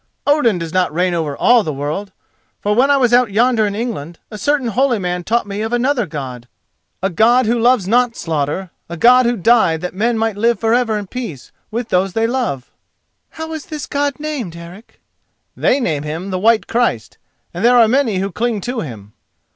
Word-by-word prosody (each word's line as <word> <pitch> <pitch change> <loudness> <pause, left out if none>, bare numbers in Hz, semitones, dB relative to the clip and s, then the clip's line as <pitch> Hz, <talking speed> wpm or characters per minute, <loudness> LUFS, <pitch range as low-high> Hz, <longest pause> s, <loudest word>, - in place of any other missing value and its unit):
Odin 285 -9 +3
does 165 -2 -6
not 185 -3 +1
reign 180 +3 0
over 155 -4 -2
all 245 -1 +5
the 160 - -3
world, 150 +8 -4 0.5
for 210 - 0
when 255 +6 +3
I 275 -3 +4
sat 240 +1 +5
out 245 -4 -2
yonder 225 0 +2
in 200 - -4
England, 205 -9 -5
a 215 - -7
certain 280 +1 0
holy 250 +2 +1
man 180 -2 -3
taught 235 +5 0
me 205 +1 -5
of 220 +1 -3
another 240 -2 +1
God—a 135 +6 -8
God 235 +8 +4
who 235 +2 +1
loves 235 -4 +3
not 240 +2 +2
slaughter, 165 +3 -3 0.2
a 170 - -6
God 250 +6 +5
who 240 0 0
died 190 -5 +3
that 180 - -4
men 225 +5 0
might 225 -1 -1
live 230 0 +1
for 225 0 +1
ever 240 -3 +1
in 205 - -5
peace 190 - -7 0.2
with 235 +1 -4
those 185 +1 +1
they 225 0 +1
love." 230 - -2 0.6
"How 320 0 -7
is 315 -2 -7
this 305 -3 -6
God 285 0 -2
named, 285 - -4
Eric?" 170 +6 -13 0.6
"They 270 - +2
name 160 - -1
Him 160 +6 -5
the 185 - -2
White 225 +3 +3
Christ, 225 - -1 0.3
and 175 +4 -5
there 245 +1 +5
are 230 -2 +6
many 240 -4 +1
who 195 +1 -2
cling 230 +3 -1
to 245 +4 -3
Him." 110 - -8
220 Hz, 205 wpm, -17 LUFS, 175-245 Hz, 0.6 s, are